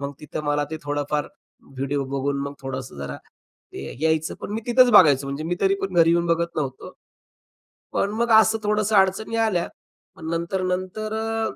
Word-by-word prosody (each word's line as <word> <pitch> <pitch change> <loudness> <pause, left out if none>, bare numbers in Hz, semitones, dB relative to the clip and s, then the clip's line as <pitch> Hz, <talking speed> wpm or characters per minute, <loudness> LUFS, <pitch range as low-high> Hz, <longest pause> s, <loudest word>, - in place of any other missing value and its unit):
मग 140 0 -4
तिथं 150 0 -6
मला 145 0 +1
ते 160 - -3
थोडंफार 145 0 -2 0.5
व्हिडिओ 140 +1 -1
बघून 140 +1 -1
मग 140 0 -4
थोडंसं 130 - -6
जरा 70 0 -5 0.6
ते 70 - -7
यायचं. 160 0 +1
पण - - -6
मी 220 - -2
तिथंच 245 0 +5
बघायचो. 140 -5 +6
म्हणजे 140 +3 -4
मी 175 +2 -1
तरी 195 0 +3
पण 195 -1 -3
घरी 165 -1 +5
येऊन 170 0 +2
बघत 170 0 0
नव्हतो. 135 -4 -4 1.0
पण 200 - 0
मग 235 0 +1
असं 220 +1 +2
थोडंसं 210 0 +1
अडचणी 195 +4 +2
आल्या. 180 -6 0 0.5
पण 160 0 -8
नंतर, 170 +3 -2
नंतर 185 +4 -3
अ 225 0 -2
165 Hz, 175 wpm, -23 LUFS, 140-195 Hz, 1.0 s, बघायचो